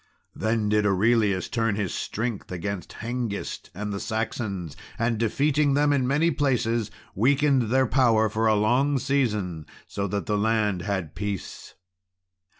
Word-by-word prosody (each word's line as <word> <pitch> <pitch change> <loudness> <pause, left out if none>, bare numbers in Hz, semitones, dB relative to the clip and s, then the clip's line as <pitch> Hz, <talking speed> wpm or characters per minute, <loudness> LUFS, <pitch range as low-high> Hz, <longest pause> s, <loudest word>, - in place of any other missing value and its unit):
Then 110 -1 0
did 105 0 +2
Aurelius 105 -1 +2
turn 115 -3 0
his 100 -4 -2
strength 115 -3 -4
against 90 +1 -4
Hengist 115 -2 -4
and 105 +1 -4
the 100 - -3
Saxons, 105 -7 -3 0.2
and, 115 -1 0
defeating 140 +5 +2
them 145 0 +3
in 130 -3 +1
many 150 +5 +2
places, 120 -6 0 0.2
weakened 135 +1 +2
their 130 +2 +3
power 115 -2 +3
for 110 +2 0
a 110 - +4
long 125 +7 +2
season, 105 - -1 0.2
so 100 0 -3
that 100 -1 -3
the 105 -1 0
land 105 -3 +1
had 90 -5 -3
peace. 100 -1 -5
110 Hz, 145 wpm, -25 LUFS, 100-125 Hz, 0.2 s, a